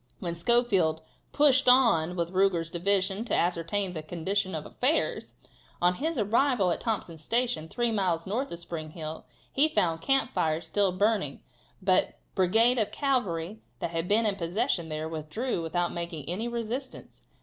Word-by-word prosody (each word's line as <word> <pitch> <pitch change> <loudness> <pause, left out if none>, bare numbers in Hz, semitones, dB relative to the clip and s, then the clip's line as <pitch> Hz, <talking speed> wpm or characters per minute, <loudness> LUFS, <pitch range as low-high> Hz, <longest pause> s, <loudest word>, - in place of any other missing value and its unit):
When 170 -2 -4
Schofield 180 -5 +2 0.3
"pushed 280 -3 +4
on 205 -10 +4
with 170 0 -2
Ruger's 180 -4 +1
division 195 +3 +1
to - - 0
ascertain 180 +3 0
the 155 - -4
condition 185 +4 -2
of 155 - -5
affairs," 285 +6 -1 0.4
on 175 +1 +3
his 315 - -2
arrival 225 -2 +2
at - - -2
Thompson's 175 -8 -3
Station, 235 -6 0
three 240 +4 0
miles 180 -6 0
north 240 +8 -2
of 170 - -5
Spring 165 -2 -6
Hill, 155 0 -7 0.3
he 285 +3 +5
found 165 - 0
camp 270 0 +1
fires 160 +1 0
still 200 -2 +1
burning, 195 -6 0 0.4
but 185 -1 +4
the - - -22 0.2
brigade 225 +7 +4
of 215 - 0
cavalry 215 - -1 0.2
that 165 - -4
had 165 +1 -2
been 220 +3 +3
in 205 -2 0
possession 175 0 -1
there, 155 0 -3
withdrew 165 - -3
without 175 +2 -1
making 170 -4 -5
any 195 +8 -2
resistance. 235 +3 -5
190 Hz, 160 wpm, -28 LUFS, 165-230 Hz, 0.4 s, he